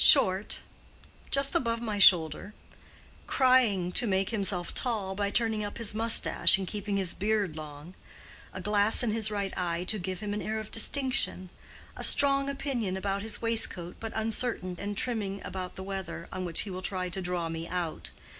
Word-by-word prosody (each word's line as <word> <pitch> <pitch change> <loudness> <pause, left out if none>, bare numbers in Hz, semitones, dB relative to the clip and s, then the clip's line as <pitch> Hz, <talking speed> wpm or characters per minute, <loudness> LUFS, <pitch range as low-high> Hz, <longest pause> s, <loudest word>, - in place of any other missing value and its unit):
"Short—just 215 +7 +2
above 230 -2 0
my 215 -3 -4
shoulder—trying 200 - +1
to 235 - +1
make 190 +1 0
himself 195 -5 -2
tall 215 -6 -2
by 200 +1 -2
turning 220 -1 0
up 205 - -6
his 230 -3 0
mustache 225 -2 +5
and 195 - -4
keeping 205 0 -3
his 185 -3 -1
beard 205 -5 -1
long—a 155 +3 -12
glass 210 +3 +4
in 230 - 0
his 220 0 +1
right 200 -2 -4
eye 175 -1 -2
to 210 +3 0
give 185 0 -5
him 205 -1 -4
an 210 - -3
air 220 +1 -3
of 215 -1 -7
distinction—a 255 -6 -1
strong 275 -1 +3
opinion 250 -9 -3
about 195 +1 -3
his 220 +1 -2
waistcoat, 225 -6 0
but 225 -1 -6
uncertain 220 -4 -3
and 205 0 -5
trimming 210 -6 -1
about 185 -1 -6
the 190 - -7
weather, 190 -3 -6
on 185 -1 -5
which 170 -2 +3
he 200 - -4
will 185 0 -6
try 185 -1 -2
to 180 +2 -5
draw 175 -2 -2
me 165 0 -6
out. 175 -3 -4
200 Hz, 165 wpm, -28 LUFS, 185-225 Hz, -, mustache